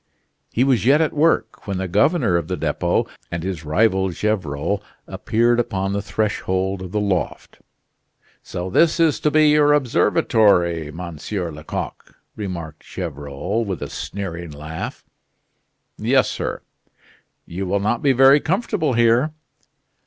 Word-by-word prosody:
He 120 Hz, -, +2 dB
was 130 Hz, -3 st, +2 dB
yet 140 Hz, +5 st, +5 dB
at 160 Hz, -2 st, +1 dB
work 145 Hz, -10 st, +1 dB
when 100 Hz, -2 st, -2 dB
the 95 Hz, 0 st, -2 dB
governor 105 Hz, -, +2 dB
of 85 Hz, -2 st, 0 dB
the 90 Hz, 0 st, -3 dB
Depot 80 Hz, +3 st, 0 dB, 0.2 s
and 85 Hz, -1 st, -4 dB
his 90 Hz, -3 st, -4 dB
rival 95 Hz, +4 st, +2 dB
Gevrol 95 Hz, -2 st, -1 dB, 0.2 s
appeared 120 Hz, +2 st, +1 dB
upon 100 Hz, -5 st, -1 dB
the 100 Hz, -, -1 dB
threshold 95 Hz, -3 st, -1 dB
of 90 Hz, -1 st, -7 dB
the 105 Hz, -, 0 dB
loft. 100 Hz, -4 st, -2 dB, 0.8 s
"So 90 Hz, +1 st, -5 dB
this 165 Hz, -, +3 dB
is 160 Hz, -3 st, +3 dB
to 150 Hz, -, +2 dB
be 155 Hz, 0 st, +4 dB
your 150 Hz, 0 st, +5 dB
observatory, 100 Hz, -, +2 dB
Monsieur 85 Hz, +2 st, -5 dB
Lecoq!" 75 Hz, 0 st, -6 dB, 0.2 s
remarked 85 Hz, -7 st, -6 dB
Gevrol, 75 Hz, +5 st, -4 dB
with 95 Hz, -5 st, -4 dB
a -, -, -6 dB
sneering 85 Hz, -4 st, -5 dB
laugh. 75 Hz, +2 st, -7 dB, 0.9 s
"Yes, 125 Hz, +1 st, +3 dB
sir." -, -, -4 dB, 0.8 s
"You 95 Hz, +3 st, -5 dB
will 100 Hz, +2 st, +1 dB
not 110 Hz, +4 st, 0 dB
be 140 Hz, -, +4 dB
very 135 Hz, +3 st, +6 dB
comfortable 180 Hz, -, 0 dB
here." 120 Hz, +5 st, +3 dB
100 Hz, 140 wpm, -21 LUFS, 85-120 Hz, 0.9 s, very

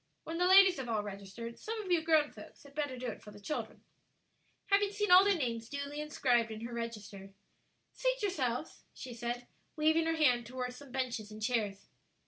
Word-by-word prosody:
When 330 Hz, +1 st, -4 dB
the 360 Hz, -, +4 dB
ladies 380 Hz, -1 st, +8 dB
have 260 Hz, -3 st, -5 dB
all 215 Hz, -2 st, 0 dB
registered, 205 Hz, +3 st, -7 dB
some 450 Hz, +1 st, -4 dB
of 375 Hz, -, -5 dB
you 345 Hz, -2 st, +4 dB
grown 315 Hz, -2 st, +3 dB
folks -, -, -13 dB
had 280 Hz, -1 st, -15 dB
better 290 Hz, -3 st, -2 dB
do 250 Hz, -, -6 dB
it 230 Hz, -, -5 dB
for 210 Hz, -, -12 dB
the 205 Hz, 0 st, -12 dB
children." 300 Hz, +9 st, -5 dB, 0.9 s
Having 400 Hz, 0 st, +4 dB
seen 415 Hz, -1 st, 0 dB
all 365 Hz, +1 st, +10 dB
their 400 Hz, -2 st, +3 dB
names 230 Hz, -5 st, -2 dB
duly 285 Hz, +1 st, -4 dB
inscribed 245 Hz, -6 st, +1 dB
in 220 Hz, 0 st, -7 dB
her 235 Hz, +1 st, -6 dB
register, 210 Hz, -4 st, -6 dB, 0.6 s
"Seat -, -, 0 dB
yourselves," 295 Hz, -, -2 dB
she 255 Hz, -, -7 dB
said, 240 Hz, +1 st, -4 dB, 0.3 s
waving 315 Hz, +1 st, +3 dB
her 325 Hz, -, +1 dB
hand 245 Hz, -7 st, +3 dB
toward 250 Hz, 0 st, -4 dB
some 275 Hz, +1 st, -12 dB
benches 245 Hz, -5 st, -2 dB
and 215 Hz, -, -9 dB
chairs. 215 Hz, -3 st, -1 dB
255 Hz, 195 wpm, -33 LUFS, 230-325 Hz, 0.9 s, all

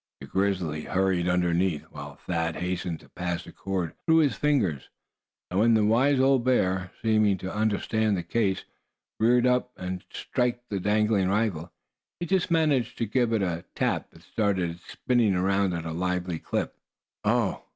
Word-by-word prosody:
The -, -, -9 dB
grizzly 90 Hz, -3 st, -1 dB
hurried 90 Hz, -2 st, +1 dB
underneath, 90 Hz, -2 st, +1 dB
while 70 Hz, 0 st, -8 dB
Thad 80 Hz, -2 st, -2 dB
hastened 90 Hz, -2 st, -3 dB
to -, -, -19 dB
pass 90 Hz, -1 st, -3 dB
the -, -, -12 dB
cord 95 Hz, -4 st, -3 dB
through 160 Hz, 0 st, +4 dB
his 150 Hz, -4 st, +4 dB
fingers 130 Hz, -, 0 dB, 0.6 s
and 90 Hz, -, +1 dB
when 115 Hz, +1 st, +5 dB
the 110 Hz, -1 st, +3 dB
wise 130 Hz, +6 st, +3 dB
old 135 Hz, -2 st, +4 dB
bear, 95 Hz, -7 st, +1 dB
seeming 110 Hz, -3 st, +3 dB
to 95 Hz, +1 st, -6 dB
understand 110 Hz, 0 st, +1 dB
the 90 Hz, -, -3 dB
case, 95 Hz, +1 st, 0 dB, 0.6 s
reared 120 Hz, +2 st, +4 dB
up 125 Hz, 0 st, +1 dB
to 90 Hz, 0 st, -4 dB
strike 125 Hz, -1 st, -1 dB
at 120 Hz, 0 st, -36 dB
the 100 Hz, -, -2 dB
dangling 105 Hz, -1 st, +2 dB
rifle, 95 Hz, -5 st, -1 dB, 0.5 s
he 175 Hz, -, -2 dB
just 185 Hz, 0 st, +1 dB
managed 150 Hz, -8 st, +1 dB
to 115 Hz, -, 0 dB
give 120 Hz, +2 st, +1 dB
it 110 Hz, -3 st, +1 dB
a 85 Hz, -2 st, -2 dB
tap -, -, -1 dB
that -, -, -19 dB
started 95 Hz, -5 st, 0 dB
it 85 Hz, -, -10 dB
to -, -, -17 dB
spinning 120 Hz, -6 st, +1 dB
around 95 Hz, +1 st, +2 dB
at 85 Hz, -1 st, -5 dB
a 80 Hz, -, -3 dB
lively 90 Hz, 0 st, -2 dB
clip. -, -, -3 dB, 0.5 s
"Oh!" -, -, +1 dB
100 Hz, 175 wpm, -27 LUFS, 90-115 Hz, 0.6 s, when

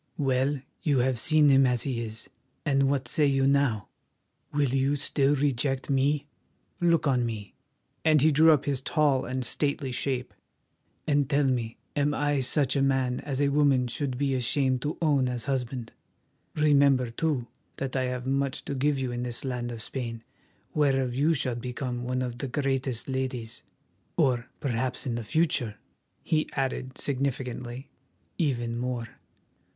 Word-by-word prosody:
Well, 135 Hz, 0 st, +1 dB, 0.2 s
you 145 Hz, -6 st, +2 dB
have 125 Hz, -1 st, +2 dB
seen 155 Hz, +2 st, +5 dB
him 135 Hz, -1 st, +6 dB
as 125 Hz, -2 st, +1 dB
he 125 Hz, -4 st, -2 dB
is, 110 Hz, 0 st, -7 dB, 0.4 s
and 135 Hz, -2 st, +3 dB
what 135 Hz, -1 st, 0 dB
say 150 Hz, -2 st, +3 dB
you 135 Hz, -1 st, +2 dB
now? 135 Hz, -8 st, +2 dB, 0.6 s
Will 145 Hz, -2 st, +1 dB
you 135 Hz, +2 st, +1 dB
still 140 Hz, 0 st, +1 dB
reject 135 Hz, -1 st, 0 dB
me? 140 Hz, +2 st, +2 dB, 0.5 s
Look 170 Hz, -2 st, +3 dB
on 130 Hz, -4 st, +2 dB
me," 110 Hz, -3 st, -5 dB, 0.5 s
and 155 Hz, -1 st, +5 dB
he 155 Hz, +3 st, +4 dB
drew 160 Hz, +3 st, +6 dB
up 145 Hz, -3 st, +3 dB
his 140 Hz, -2 st, 0 dB
tall 145 Hz, -2 st, +2 dB
and 130 Hz, 0 st, -3 dB
stately 140 Hz, +1 st, -1 dB
shape, 125 Hz, 0 st, -2 dB, 0.7 s
"and 145 Hz, -2 st, +2 dB
tell 145 Hz, 0 st, +3 dB
me, 120 Hz, -4 st, -1 dB, 0.2 s
am 145 Hz, 0 st, +1 dB
I 145 Hz, -1 st, +1 dB
such 135 Hz, +1 st, +1 dB
a 140 Hz, -, +2 dB
man 130 Hz, -2 st, +1 dB
as 140 Hz, -2 st, -4 dB
a 145 Hz, -1 st, +3 dB
woman 140 Hz, -3 st, +3 dB
should 130 Hz, +1 st, -3 dB
be 140 Hz, 0 st, 0 dB
ashamed 130 Hz, +1 st, +1 dB
to 150 Hz, -, -3 dB
own 140 Hz, -5 st, +3 dB
as 125 Hz, -2 st, -3 dB
husband? 125 Hz, -3 st, -3 dB, 0.6 s
Remember, 140 Hz, -5 st, +4 dB
too, 140 Hz, -1 st, -1 dB, 0.3 s
that 135 Hz, -1 st, -4 dB
I 130 Hz, -1 st, +1 dB
have 125 Hz, 0 st, -3 dB
much 135 Hz, 0 st, -1 dB
to -, -, -3 dB
give 140 Hz, +2 st, +1 dB
you 130 Hz, -2 st, -2 dB
in 120 Hz, 0 st, -3 dB
this 125 Hz, +1 st, -4 dB
land 125 Hz, -2 st, -3 dB
of 115 Hz, -2 st, -6 dB
Spain, 115 Hz, -3 st, -5 dB, 0.5 s
whereof 135 Hz, -4 st, +2 dB
you 150 Hz, +6 st, +2 dB
shall 130 Hz, -3 st, 0 dB
become 125 Hz, +1 st, -4 dB
one 130 Hz, +1 st, -1 dB
of 120 Hz, -1 st, -5 dB
the 135 Hz, -, -3 dB
greatest 135 Hz, -3 st, -1 dB
ladies, 130 Hz, -4 st, -3 dB, 0.6 s
or 125 Hz, -2 st, +2 dB
perhaps 130 Hz, -1 st, -2 dB
in 125 Hz, -, -1 dB
the 115 Hz, 0 st, -3 dB
future," 125 Hz, -4 st, +1 dB, 0.5 s
he 155 Hz, -1 st, 0 dB
added 130 Hz, -1 st, -2 dB
significantly, 130 Hz, -2 st, -3 dB, 0.5 s
"even 120 Hz, -7 st, 0 dB
more. 125 Hz, -2 st, -3 dB
135 Hz, 165 wpm, -27 LUFS, 125-145 Hz, 0.7 s, him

